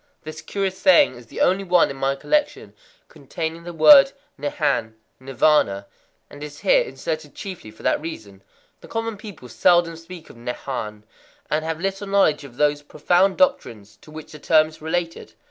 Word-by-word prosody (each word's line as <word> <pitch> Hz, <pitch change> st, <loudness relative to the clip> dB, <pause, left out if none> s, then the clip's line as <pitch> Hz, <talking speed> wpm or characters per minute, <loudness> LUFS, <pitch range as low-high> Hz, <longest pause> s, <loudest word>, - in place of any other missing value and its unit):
This 155 Hz, -1 st, -8 dB
curious 195 Hz, -2 st, -3 dB
saying 290 Hz, -, +5 dB
is 120 Hz, -2 st, -14 dB
the -, -, -7 dB
only 190 Hz, +2 st, +2 dB
one 180 Hz, -5 st, +3 dB
in -, -, -8 dB
my 135 Hz, 0 st, -1 dB
collection 295 Hz, -, -2 dB, 0.3 s
containing 165 Hz, 0 st, -6 dB
the 175 Hz, -, -6 dB
word 275 Hz, -, +7 dB, 0.2 s
Nehan 135 Hz, -6 st, -2 dB, 0.3 s
(Nirvâna), 130 Hz, -7 st, +1 dB, 0.4 s
and 145 Hz, +1 st, -12 dB
is 150 Hz, -1 st, -10 dB
here -, -, +4 dB
inserted -, -, -6 dB
chiefly 185 Hz, -, -8 dB
for 110 Hz, -, -16 dB
that -, -, +1 dB
reason. 110 Hz, -12 st, -9 dB, 0.4 s
The -, -, -15 dB
common 225 Hz, -1 st, -4 dB
people 200 Hz, -, -11 dB
seldom 170 Hz, +6 st, +2 dB
speak 165 Hz, 0 st, -12 dB
of -, -, -18 dB
Nehan, 115 Hz, -3 st, -6 dB, 0.5 s
and 155 Hz, +1 st, 0 dB
have 160 Hz, 0 st, -4 dB
little 195 Hz, +2 st, -4 dB
knowledge 195 Hz, -7 st, +2 dB
of 130 Hz, -3 st, -13 dB
those 145 Hz, 0 st, +1 dB
profound 175 Hz, +6 st, +1 dB
doctrines 110 Hz, -, -1 dB
to -, -, -17 dB
which 155 Hz, 0 st, -11 dB
the 150 Hz, -, -11 dB
term 155 Hz, +1 st, +3 dB
is 155 Hz, -, -17 dB
related. 165 Hz, +1 st, -4 dB
155 Hz, 170 wpm, -22 LUFS, 135-190 Hz, 0.5 s, word